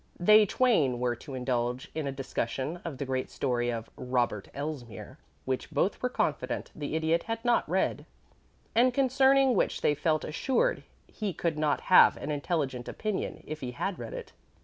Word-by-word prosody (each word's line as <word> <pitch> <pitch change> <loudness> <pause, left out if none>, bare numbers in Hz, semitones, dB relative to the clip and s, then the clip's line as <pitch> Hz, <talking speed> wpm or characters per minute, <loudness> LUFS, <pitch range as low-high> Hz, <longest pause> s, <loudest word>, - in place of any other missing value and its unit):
They 210 +4 +6
twain 165 - +2
were 120 -1 0
to 135 +1 -9
indulge 125 -1 -2
in 155 -3 -3
a - - -1
discussion 135 +3 -3
of 160 -6 -5
the 140 - -3
great 130 -1 -2
story 120 -3 -1
of 115 -2 -3
Robert 125 -5 -1
Elsmere, 140 -5 -6 0.3
which 130 -1 -2
both 195 - 0
were 250 - 0
confident - - -2
the 150 0 -4
Idiot 160 +1 +2
had 225 +1 -3
not 240 -1 +2
read, - - 0 0.7
and 245 +2 +4
concerning 270 0 +4
which 200 - 0
they 150 - +3
felt 155 +1 0
assured 265 - 0 0.2
he 210 -4 -4
could 160 -1 -2
not 150 -2 +1
have 185 - +6
an 150 - -4
intelligent 140 -4 -2
opinion 215 -3 -3
if 155 +1 -6
he 125 -2 -4
had 195 +9 -3
read - - -6
it. 475 -2 -8
155 Hz, 170 wpm, -29 LUFS, 130-215 Hz, 0.7 s, They